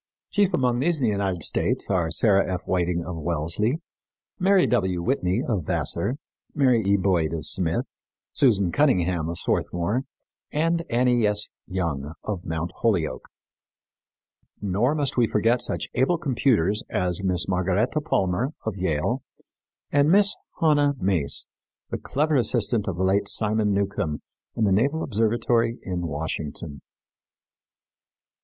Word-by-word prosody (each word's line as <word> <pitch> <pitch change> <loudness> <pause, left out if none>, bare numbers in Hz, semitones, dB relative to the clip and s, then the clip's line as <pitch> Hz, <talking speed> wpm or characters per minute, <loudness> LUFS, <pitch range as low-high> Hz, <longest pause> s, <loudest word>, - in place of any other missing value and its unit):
Chief 200 -2 +2
among 125 -2 +1
these 160 +3 +1
in 130 - +1
the 110 - +2
United 95 -5 -1
States - - 0
are 90 -4 +1
Sarah 100 0 +2
F. 90 - -3
Whiting, 85 -2 -1
of 90 -2 -5
Wellesley; 85 - -1 0.6
Mary 190 0 +4
W. 95 -2 +1
Whitney, 100 -1 0
of 105 - 0
Vassar; 115 +7 -1 0.4
Mary 130 -5 +3
E. 100 +1 +3
Boyd, 90 -5 +1
of 80 -2 -4
Smith; 85 +1 0 0.5
Susan 100 -9 +3
Cunningham, 90 - +2
of 85 - -4
Swarthmore, 100 +9 -1 0.5
and 165 +2 +1
Annie 120 -2 +3
S. 105 0 -1 0.2
Young, 80 -6 -3
of 100 -5 -4
Mt. 80 +2 -3
Holyoke. 95 -9 -1 1.3
Nor 105 +8 +1
must 145 -4 -1
we 120 -2 +4
forget 115 +4 +2
such - - -3
able 135 +8 +2
computers 120 - +1
as 90 0 0
Mrs. 90 -3 0
Margaretta 95 - 0
Palmer, 120 - 0
of 110 -3 -2
Yale, 95 - -1 0.7
and 145 +1 +3
Miss 200 +3 +5 0.2
Hanna 145 -3 +3
Mace, 90 -7 0 0.5
the - - -2
clever 150 +1 0
assistant 120 -3 +1
of 95 -3 -2
the 95 - 0
late 100 +2 +2
Simon 105 0 +2
Newcomb 100 -6 -1 0.3
in 115 - 0
the 100 - +3
Naval 140 +11 +2
Observatory 115 +1 +1
in 90 -2 -3
Washington. 75 -1 -5
100 Hz, 135 wpm, -24 LUFS, 90-125 Hz, 1.3 s, Miss